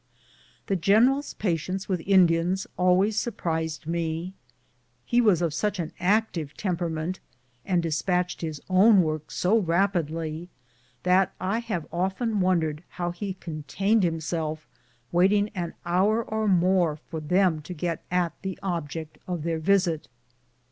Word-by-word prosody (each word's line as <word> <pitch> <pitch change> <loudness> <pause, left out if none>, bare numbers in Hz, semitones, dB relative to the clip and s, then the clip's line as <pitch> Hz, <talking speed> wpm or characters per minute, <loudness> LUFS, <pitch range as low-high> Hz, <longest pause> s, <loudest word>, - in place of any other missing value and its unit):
The 195 - 0
general's 230 - +3
patience 185 0 -2
with 185 -4 -1
Indians 180 -1 +3
always 185 +4 +3
surprised 160 -8 -3
me. 165 +2 -2 0.7
He 240 - +3
was 195 -7 +3
of 165 - +1
sucli 205 +6 -1
an 165 -3 -3
active 180 -5 0
temperament 175 -2 -2 0.5
and 180 -3 +2
de 165 - -1
spatched 180 +3 0
his 155 -3 -4
own 190 +1 +6
work 155 -1 -3
so 210 +5 +2
rapidly 165 -3 -1 0.5
that 185 +1 +3
I 195 +5 0
have 210 -9 -3
often 195 +5 -1
wondered 165 -4 +1
how 175 -1 -3
he 190 +2 -5
contained 185 +7 0
himself 160 -2 -2 0.4
waiting 200 +4 +3
an 175 -4 -5
hour 195 +6 +2
or 220 0 -2
more 180 -3 +3
for 160 +1 -8
them 175 +1 +2
to 150 +4 -7
get 165 0 -3
at 175 -2 +1
the 190 -2 -4
object 160 -4 -4
of 175 -4 -3
their 165 -1 -1
visit. 175 -2 +1
180 Hz, 135 wpm, -26 LUFS, 165-195 Hz, 0.7 s, own